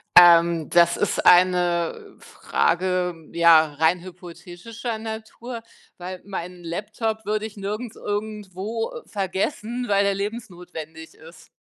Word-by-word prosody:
Ähm, 170 Hz, -2 st, +7 dB
das 170 Hz, 0 st, +4 dB
ist -, -, -1 dB
eine 175 Hz, -1 st, +3 dB
Frage, 180 Hz, +1 st, 0 dB, 0.2 s
ja, 165 Hz, -3 st, +5 dB
rein 160 Hz, +4 st, +2 dB
hypothetischer 180 Hz, +6 st, -8 dB
Natur, 225 Hz, +2 st, -7 dB, 0.4 s
weil 180 Hz, 0 st, -7 dB
meinen 180 Hz, -2 st, -7 dB
Laptop 215 Hz, +5 st, -4 dB
würde 215 Hz, +1 st, -1 dB
ich 215 Hz, -, -8 dB
nirgends 210 Hz, +4 st, -5 dB
irgendwo 210 Hz, +1 st, -4 dB
vergessen, 215 Hz, +5 st, -3 dB
weil 200 Hz, 0 st, +3 dB
der 200 Hz, 0 st, +1 dB
lebensnotwendig 175 Hz, -7 st, -7 dB
ist. 160 Hz, 0 st, -16 dB
185 Hz, 110 wpm, -23 LUFS, 170-215 Hz, 0.4 s, Ähm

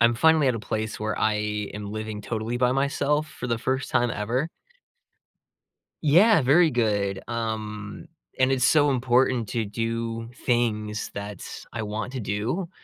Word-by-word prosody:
I'm 120 Hz, 0 st, +5 dB
finally 160 Hz, +3 st, +4 dB
at 125 Hz, -, +2 dB
a 115 Hz, -, -3 dB
place 110 Hz, +1 st, -3 dB
where 110 Hz, 0 st, -2 dB
I 110 Hz, -1 st, +2 dB, 0.4 s
am 105 Hz, 0 st, -6 dB
living 110 Hz, -1 st, -5 dB
totally 110 Hz, +3 st, -3 dB
by 125 Hz, 0 st, +3 dB
myself 140 Hz, +2 st, +1 dB
for 125 Hz, -, -7 dB
the 115 Hz, -1 st, 0 dB
first 130 Hz, +2 st, -2 dB
time 120 Hz, 0 st, +2 dB
ever. 115 Hz, +7 st, -1 dB, 1.6 s
Yeah, 175 Hz, +5 st, +6 dB
very 155 Hz, +5 st, +5 dB
good, 100 Hz, -5 st, 0 dB
um, 110 Hz, -3 st, -4 dB, 0.3 s
and 130 Hz, 0 st, +3 dB
it's 130 Hz, -1 st, +3 dB
so 145 Hz, -2 st, +4 dB
important 125 Hz, -2 st, +2 dB
to 115 Hz, -2 st, -1 dB
do 115 Hz, +1 st, -3 dB
things; 110 Hz, -4 st, 0 dB
that's 100 Hz, -1 st, -7 dB
I 115 Hz, -, -3 dB
want 110 Hz, +4 st, -4 dB
to 130 Hz, -, -4 dB
do. 115 Hz, -, -2 dB
115 Hz, 155 wpm, -25 LUFS, 110-130 Hz, 1.6 s, Yeah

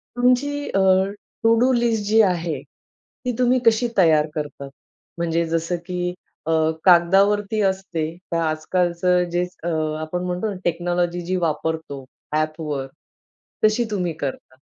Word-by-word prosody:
तुमची 250 Hz, +3 st, +3 dB, 0.2 s
अ, 195 Hz, -, 0 dB, 0.6 s
to 225 Hz, 0 st, +5 dB
do 255 Hz, +2 st, +4 dB
list 235 Hz, -3 st, +1 dB
जी 220 Hz, +2 st, +3 dB
आहे, 170 Hz, -2 st, -2 dB
ती -, -, -38 dB, 0.5 s
तुम्ही 250 Hz, 0 st, +3 dB
कशी 230 Hz, +2 st, +4 dB
तयार 160 Hz, -5 st, +4 dB
करतात? 145 Hz, -2 st, -5 dB, 0.5 s
म्हणजे 170 Hz, 0 st, 0 dB
जसं, 165 Hz, +2 st, -1 dB
की 180 Hz, -1 st, -2 dB, 0.3 s
अ, -, -, -1 dB, 0.3 s
कागदावरती 195 Hz, +4 st, +4 dB
असते 190 Hz, -4 st, -4 dB, 0.3 s
तर -, -, +1 dB
आजकालचं 175 Hz, +3 st, +1 dB
जे 175 Hz, +1 st, +1 dB, 0.2 s
अ, 170 Hz, -, -3 dB, 0.3 s
आपण 180 Hz, +3 st, -3 dB
म्हणतो 180 Hz, +4 st, -2 dB
ना 200 Hz, -, -6 dB
टेक्नॉलॉजी 175 Hz, +1 st, 0 dB
जी 185 Hz, +1 st, 0 dB
वापरतो 160 Hz, -3 st, -3 dB, 0.3 s
ॲपवर, 155 Hz, -3 st, -2 dB, 0.8 s
तशी 215 Hz, +3 st, +4 dB
तुम्ही 180 Hz, -5 st, -1 dB
करता? 130 Hz, -1 st, -5 dB
175 Hz, 130 wpm, -22 LUFS, 160-205 Hz, 0.8 s, to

